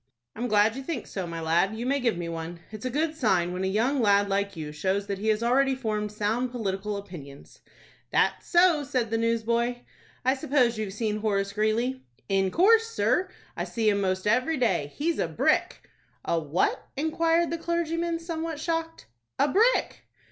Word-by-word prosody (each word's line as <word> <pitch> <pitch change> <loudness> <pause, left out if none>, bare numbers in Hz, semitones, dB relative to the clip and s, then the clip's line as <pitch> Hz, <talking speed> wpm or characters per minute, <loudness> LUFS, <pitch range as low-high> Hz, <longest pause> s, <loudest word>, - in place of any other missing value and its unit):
"I'm 240 +3 -2
glad 215 0 +3
you 270 - -5
think 270 -2 -4
so, 190 -3 -5
my 165 0 -5
lad. 170 +6 +1
You 235 - -4
may 280 +2 +1
give 235 -7 0
me 170 -1 -4
one. 165 +1 -6
It's 215 +2 -8
a - - -2
good 305 +5 0
sign 185 - +1
when 185 +1 -3
a - - +1
young 240 +8 +1
lad 200 -2 +3
like 200 0 -1
you 150 -2 -5
shows 190 +6 -1
that 200 -1 -4
he 215 - -3
has 215 +1 +2
already 265 +3 +3
formed 215 -4 -2
sound 215 +4 -1
political 210 -3 -3
opinions." 145 -8 -11 0.5
"That's - - +1
so," 345 -4 +4
said 255 -5 -2
the 225 - +1
newsboy. 235 +1 0 0.4
"I 260 - +4
suppose 255 -4 +1
you've 205 -3 -3
seen 215 0 -1
Horace 200 -2 -1
Greeley?" 225 +5 0 0.3
"In 195 -1 +2
course, 445 - +4
sir, 380 -4 +1 0.3
I - - -2
see 225 -2 0
him 200 -1 +1
most 185 -1 -1
every 255 +9 +2
day. 180 - 0
He's 330 +3 -1
a - - +1
brick!" - - 0 0.4
"A 170 - +1
what?" 155 +3 0
inquired 330 +3 +1
the 335 - -2
clergyman, 335 0 -1
somewhat 330 -2 -4
shocked. 325 0 -3 0.3
"A - - +3
brick!" 450 - +2
225 Hz, 185 wpm, -27 LUFS, 200-285 Hz, 0.5 s, so